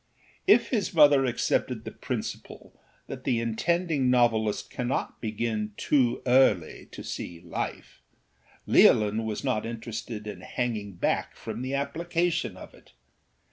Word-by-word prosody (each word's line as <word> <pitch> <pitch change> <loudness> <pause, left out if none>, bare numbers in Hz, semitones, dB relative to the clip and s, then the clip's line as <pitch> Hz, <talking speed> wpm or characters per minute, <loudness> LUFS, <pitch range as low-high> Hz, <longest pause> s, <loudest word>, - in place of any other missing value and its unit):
If 240 -11 +5
his 210 -7 -1
mother 145 -3 +6
accepted 120 -2 0
the - - -5
principle - - -6 0.3
that - - -8
the 120 -3 +1
intending 145 +4 0
novelist 115 -4 +2
cannot 125 +1 -3
begin 110 -1 -2
too 125 -4 +1
early 125 -10 +3
to - - -8
see 85 -1 -6
life, 85 -1 -6 0.6
Leolin 110 +1 +4
was 110 -1 -3
not 125 -6 0
interested 115 -1 -6
in 100 -4 -7
hanging 110 -3 -3
back 85 - -1
from - - -6
the 130 +2 -2
application 165 - -1
of - - -11
it. - - -20
120 Hz, 130 wpm, -27 LUFS, 110-140 Hz, 0.6 s, mother